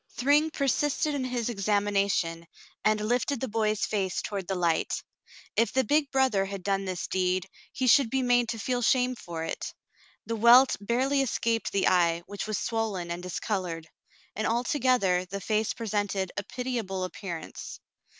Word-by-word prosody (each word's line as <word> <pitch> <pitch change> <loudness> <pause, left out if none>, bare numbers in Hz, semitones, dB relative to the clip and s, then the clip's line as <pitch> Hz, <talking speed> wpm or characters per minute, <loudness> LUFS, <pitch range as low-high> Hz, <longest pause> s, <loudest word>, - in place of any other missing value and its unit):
Thryng 290 +5 +3
persisted 295 +1 0
in 280 -2 -1
his 245 -3 -2
examination, 200 -5 0 0.4
and 215 0 +3
lifted 245 +3 0
the 265 - -2
boy's 215 -2 0
face 195 -4 -1
toward 195 -3 -4
the 195 - -1
light. 170 -2 0 0.5
If 230 -2 +2
the 265 - +3
big 290 0 +2
brother 260 -8 +2
had 195 -1 -6
done 195 0 0
this 185 -2 -3
deed, 185 0 0 0.2
he 260 - -2
should 255 0 +5
be 265 +2 0
made 245 -1 +3
to 225 - -2
feel 245 +3 -1
shame 250 +1 +3
for 170 -8 -6
it. 165 - -5 0.5
The 230 - -2
welt 240 +4 +7
barely 260 +6 +1
escaped 230 -3 0
the 195 - +2
eye, 170 -1 +3
which 205 +1 -6
was 215 - -1
swollen 210 -7 -2
and 170 +1 -4
discolored; 180 -2 -3 0.5
and 215 - -1
altogether 240 -6 +2
the 200 +2 -5
face 215 +2 0
presented 205 -4 -2
a - - -1
pitiable 225 -5 -3
appearance. 180 -3 -7
215 Hz, 160 wpm, -28 LUFS, 190-250 Hz, 0.5 s, welt